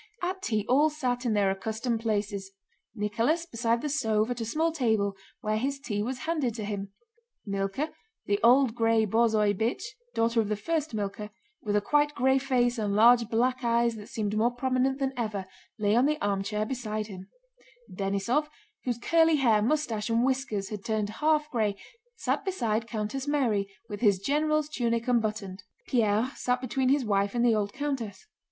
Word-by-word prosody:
At 375 +1 -2
tea 215 - -1
all 290 +5 +4
sat 250 -5 -2
in 225 - +2
their 200 -2 +3
accustomed 220 +4 -2
places: 205 -3 -2 0.5
Nicholas 230 +11 0
beside 235 -5 -1
the - - 0
stove 225 -5 +1
at 245 -1 -3
a - - -2
small 315 +9 0
table 220 -9 +1 0.3
where 215 0 0
his 275 +4 -2
tea 210 -7 -3
was 250 +4 -3
handed 300 -9 0
to 215 -3 -4
him; 200 -1 -4 0.6
Mílka, 195 +9 -2 0.3
the 205 0 +1
old 250 0 +5
gray 225 -1 +2
borzoi 220 -1 +3
bitch 220 +5 -1 0.3
(daughter 230 0 +2
of 210 - -3
the 210 - +1
first 310 +3 -2
Mílka), 210 0 -4 0.3
with 210 -1 -1
a 210 - +3
quite 295 +6 +2
gray 265 +2 +3
face 245 -3 +1
and 205 -2 0
large 230 +1 +6
black 250 +3 +1
eyes 235 0 +2
that 210 -1 -10
seemed 210 -2 -2
more 225 +2 +3
prominent 255 +1 0
than 270 -1 -1
ever, 215 -5 -3 0.3
lay 210 0 +2
on 250 +4 +4
the 305 0 0
armchair 205 0 -1
beside 215 -3 -3
him; 190 -3 -10 0.7
Denísov, 200 +10 0 0.4
whose 245 -2 -1
curly 325 +5 +4
hair, 230 -7 +3
mustache, 230 -4 0
and 230 +2 +2
whiskers 255 -7 -1
had 210 -2 -6
turned 215 -2 -1
half 305 -1 +3
gray, 215 -4 0 0.4
sat - - -1
beside 230 - -1
countess 230 +5 -3
Mary 230 -9 +1 0.2
with 205 +1 -7
his 205 -5 +4
general's 305 +7 +1
tunic 235 -5 -1
unbuttoned; 215 -5 -1 0.2
Pierre 225 +1 +1
sat 250 0 0
between 255 +1 0
his 275 -2 +2
wife 200 0 +1
and 240 0 +2
the 235 - +5
old 205 -2 0
countess. 265 -8 -4
230 Hz, 175 wpm, -28 LUFS, 210-265 Hz, 0.7 s, large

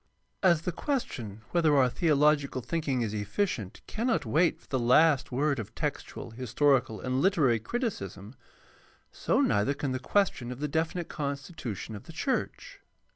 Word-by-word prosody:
As 170 -4 +4
the 180 - -1
question 125 - -3
whether 160 -4 +3
our 130 -2 +5
theological 145 -2 +2
thinking 140 -6 -1
is 110 -2 -3
efficient 110 - -2
cannot 230 - -1
wait 160 +9 +2
for - - -24
the 130 - -1
last 135 +4 +4
word 140 +2 +1
of 110 - -7
textual, 115 - -4
historical, 125 0 +1
and 130 +1 -1
literary 140 - +3
criticism, 110 - -4 0.8
so - - +1
neither 105 +8 +2
can 140 -1 -2
the 130 - -2
question 130 -5 0
of 125 - -7
the 150 - -1
definite 160 +3 -1
constitution 140 - -5
of 105 - -10
the 165 - -11
church. 285 - -3
140 Hz, 150 wpm, -29 LUFS, 120-165 Hz, 0.8 s, our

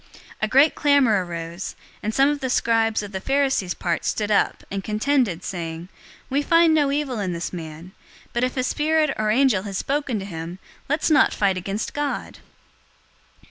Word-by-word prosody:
023:009 - - -27 0.3
A 215 - +2
great 275 +7 +5
clamor 265 -9 +3
arose, 170 +1 -6 0.3
and 215 - -2
some 270 +4 +4
of 290 0 0
the 260 -2 -3
scribes 225 -3 +2
of 205 - -7
the 190 - -4
Pharisees 270 -8 +1
part 170 -2 -2
stood 215 -1 -1
up, 205 - +1
and 195 -1 -3
contended, 215 - 0
saying, 170 -1 -5 0.4
"We 275 +2 0
find 330 +2 +4
no 290 -3 +3
evil 280 -5 -1
in 185 -3 -2
this 170 +2 -4
man. 165 +1 -8 0.4
But 240 - 0
if 255 +1 -1
a 255 - +1
spirit 310 +3 +1
or 215 0 0
angel 240 -3 +3
has 195 -1 -5
spoken 280 -2 -1
to 195 - -5
him, 170 -1 -6 0.3
let's 300 +2 +1
not 305 - +4
fight 195 -2 +2
against 195 +4 -4
God!" 290 -1 -3
215 Hz, 180 wpm, -23 LUFS, 185-280 Hz, 0.4 s, great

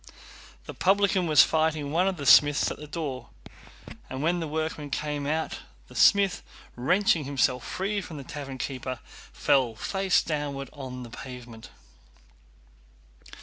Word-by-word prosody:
The - - -7
publican 195 -1 +2
was 155 -2 +7
fighting 155 -2 0
one 175 +4 +2
of 190 -2 -1
the 145 - -6
smiths 145 +1 +6
at - - -6
the 150 - -10
door, 140 - -5 0.8
and 130 +2 -4
when 175 +2 +1
the 165 - -3
workmen 155 -1 -3
came 145 0 -3
out 160 +2 -2 0.3
the - - -13
smith, 200 -2 +4 0.3
wrenching 165 +4 +2
himself 130 -2 +1
free 200 +2 -2
from 160 -4 -9
the 140 - -7
tavern 135 -1 -7
keeper, 130 -1 -4 0.3
fell 130 -5 +2
face 195 - +1
downward 145 -3 -4
on 130 -3 -7
the 120 - -11
pavement. 120 -3 -10
145 Hz, 145 wpm, -27 LUFS, 130-165 Hz, 0.8 s, was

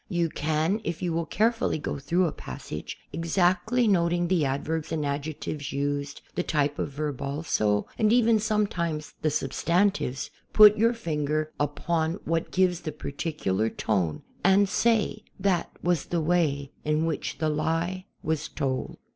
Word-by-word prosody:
You 170 -2 +1
can, 160 +8 0
if 170 0 -3
you 175 -2 0
will 165 0 -1
carefully 225 -3 +1
go 150 - -4
through 175 +6 +1
a 165 - 0
passage, - - -7 0.2
exactly 185 +8 +2
noting 175 -3 +2
the 180 -4 +3
adverbs 150 +4 -2
and 155 -2 -1
adjectives 145 0 -3
used, 140 0 -2
the - - 0
type 145 -4 0
of - - -1
verb 145 -1 -4
also, 140 -8 0
and 215 -1 +4
even, 230 -2 +5
sometimes, 180 -8 -1
the 155 - +2
substantives, 155 0 0 0.2
put 210 -1 +9
your 230 +3 +3
finger 155 -6 -1
upon 160 +3 0
what 165 0 0
gives 180 -2 +2
the 160 -2 -4
particular 140 - -2
tone 90 -11 -1 0.2
and 195 +2 +5
say: 225 +2 +1 0.2
''That 190 -2 +1 0.2
was 175 -4 +1
the 175 - -1
way 155 -4 +1
in 155 +1 +1
which 160 -2 -2
the 155 +1 0
lie 165 +4 -1 0.2
was 155 -1 -1
told." 130 -2 -3
160 Hz, 150 wpm, -27 LUFS, 145-180 Hz, 0.2 s, put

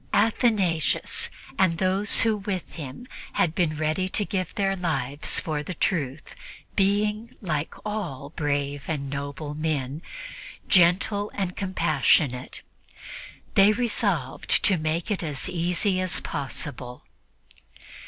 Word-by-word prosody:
Athanasius 205 - +2 0.3
and 170 -3 +4
those 190 +3 +3
who 225 -1 +3
with 195 -3 -4
him 145 - -7 0.3
had 160 - +2
been 160 -3 +1
ready 155 +5 0
to 205 - 0
give 185 -3 -3
their 195 -2 +1
lives 145 -6 0
for 155 -2 -2
the 180 +4 -5
Truth 155 -4 -1 0.4
being, 210 +4 +1
like 155 -6 -2
all 175 -10 -4
brave 145 -2 -1
and 140 -3 -3
noble 140 +1 -4
men, 150 -2 -2 0.7
gentle 195 +4 +4
and 185 -3 -2
compassionate, 145 -8 +1 0.9
they 200 +2 +6
resolved 205 - -1
to 195 - +5
make 160 +5 -1
it 205 - 0
as 150 -5 -2
easy 180 +2 +1
as 185 0 +1
possible. 130 -3 -5
170 Hz, 115 wpm, -26 LUFS, 145-195 Hz, 0.9 s, they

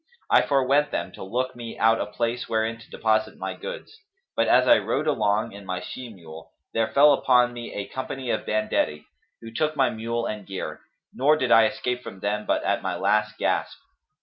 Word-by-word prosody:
I - - +7
forewent 140 +1 +2
them, 95 - -3
to - - -9
look 125 +6 -2
me 120 -2 -8
out 115 0 +3
a - - -2
place 115 +3 -2
wherein 110 0 0
to 110 - -16
deposit 110 -1 0
my - - -4
goods: - - -8 0.4
but, - - +2
as - - +5
I 300 - +7
rode 145 - -1
along 105 -8 +1
on 100 - -10
my 90 -1 -3
she 130 -2 -8
mule, 80 -5 -12 0.2
there 115 -1 +1
fell 145 +1 +7
upon 125 -2 +3
me 120 -1 -7
a 100 - -3
company 130 -1 -4
of - - -2
banditti, 105 -8 0 0.4
who 115 -1 -9
took 155 +5 0
my 135 -3 +2
mule 115 +1 -3
and 105 -4 -5
gear; 95 -1 -5 0.3
nor 150 +4 +3
did 130 -5 -1
I 115 -1 +7
escape 125 +3 -3
from 95 - -9
them 105 +2 -2
but - - +1
at - - 0
my - - -2
last 105 +2 +1
gasp." - - -1
115 Hz, 200 wpm, -25 LUFS, 105-130 Hz, 0.4 s, I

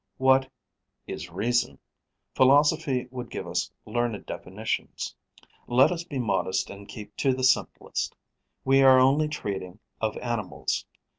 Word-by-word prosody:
What 130 0 +4 0.6
is 80 +3 -6
reason? 100 - 0 0.6
Philosophy 140 -1 +4
would 125 -2 -6
give - - -5
us - - -2
learned 120 -1 -2
definitions. - - -4 0.5
Let 125 +6 +5
us 170 -1 -3
be 155 -5 -6
modest 100 -5 0
and 100 0 -11
keep 105 -2 -10
to 135 -2 +2
the 130 - -4
simplest: 130 - +1 0.5
we 135 +1 +5
are 130 -1 +8
only 140 +4 +4
treating 100 -10 -5 0.2
of 110 -1 -1
animals. 120 -5 -3
125 Hz, 130 wpm, -27 LUFS, 105-135 Hz, 0.6 s, are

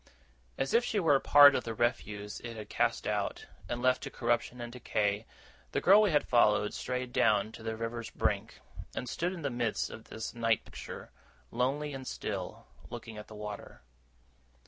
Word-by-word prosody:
As 135 - -1
if 235 - +5
she 220 -3 0
were 165 -6 +4
a 135 - +5
part 145 0 +8
of - - 0
the 115 -1 -4
refuse 105 -3 -2
it 115 -1 -7
had 105 -1 -8
cast - - 0
out, - - -2 0.2
and 120 +1 -3
left 130 0 +3
to - - -5
corruption 120 0 -1
and 120 0 -6
decay, 105 -3 -1 0.5
the - - +2
girl 200 +4 +7
we 210 - +4
had 150 -4 +2
followed 105 -3 +3
strayed 125 -1 -3
down 105 0 +3
to 115 - -11
the 110 0 -3
river's 115 0 -4
brink, - - -2 0.3
and 125 - -3
stood 175 +7 -1
in 175 -4 -7
the 140 - -1
midst 120 -2 -1
of 110 - -10
this 110 - -6
night 115 -1 +1
picture, - - -9 0.4
lonely 140 +5 -1
and 130 -1 -7
still, - - -5 0.2
looking 110 -2 -8
at 105 - -10
the 110 - -11
water. 105 -12 -8
120 Hz, 190 wpm, -31 LUFS, 110-135 Hz, 0.5 s, part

